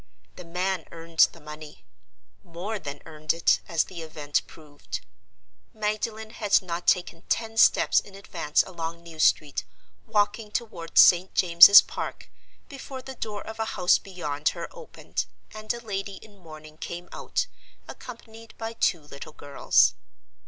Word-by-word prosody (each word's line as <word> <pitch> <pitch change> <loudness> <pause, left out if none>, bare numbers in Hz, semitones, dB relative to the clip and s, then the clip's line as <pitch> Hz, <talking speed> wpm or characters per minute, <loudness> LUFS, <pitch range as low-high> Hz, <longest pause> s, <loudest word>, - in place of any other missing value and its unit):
The 180 - -10
man 180 0 -2
earned 165 0 +3
the - - -15
money—more 150 - -10
than 145 -5 -8
earned 155 -1 -2
it, 165 - +3
as 165 -3 +1
the 175 -3 -9
event 150 -2 -2
proved. 150 -2 -9 0.7
Magdalen 215 +1 -3
had 210 -3 +2
not 175 -1 -5
taken 175 -2 +1
ten 225 -1 -1
steps 225 - +5
in 195 - -13
advance 155 -6 0
along 170 -1 -6
New 165 -2 -12
Street, 150 - +2 0.4
walking 210 +1 0
toward 210 -7 -5
St. 180 +1 +6
James's 180 +3 +9
Park, - - -7 0.4
before 270 -2 -9
the 265 - -8
door 210 -4 -5
of 220 0 -9
a 220 - 0
house 180 -1 +4
beyond 155 -6 -2
her - - -5
opened, 480 -1 -6 0.3
and 215 0 -4
a 235 - -4
lady 200 -3 -5
in 205 +1 -15
mourning 155 -2 -13
came 175 +1 -6
out, - - -2 0.4
accompanied 230 -2 -11
by 225 0 -5
two 180 -7 +1
little 145 +1 -11
girls. 95 -12 +2
175 Hz, 145 wpm, -26 LUFS, 155-215 Hz, 0.7 s, James's